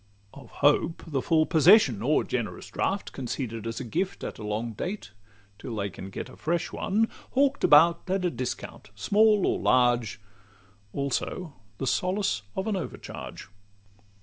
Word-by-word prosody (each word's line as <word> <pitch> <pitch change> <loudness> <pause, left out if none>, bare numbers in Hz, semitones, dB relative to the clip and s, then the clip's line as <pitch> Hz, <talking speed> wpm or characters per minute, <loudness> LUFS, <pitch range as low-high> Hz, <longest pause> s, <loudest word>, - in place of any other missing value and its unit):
Of 135 -5 -13
hope 155 +3 +2
the 145 -5 -2
full 160 +1 +3
possession, 160 - +5
Or 145 +6 +2
generous 120 -4 -4
draft, 195 +1 -2
conceded 115 -3 -4
as 115 0 -4
a - - -4
gift, 180 - -3
At - - -6
a - - -7
long 110 +2 -3
date 180 - -5 0.5
till 120 - -6
they 100 -2 -2
can 95 +1 -9
get 95 - -6
a 130 - -13
fresh 170 +1 -2
one 215 +4 +1 0.3
Hawk'd 275 +1 +2
about 165 +5 +5
at 190 -1 0
a 175 - +1
discount, 125 -3 -6
small 205 - +3
or - - +1
large; 120 -4 +2 0.7
Also 140 - -3 0.2
the 135 - -3
solace 185 - 0
of 190 - -2
an 220 -2 0
overcharge. 185 - -7
140 Hz, 155 wpm, -27 LUFS, 115-185 Hz, 0.7 s, possession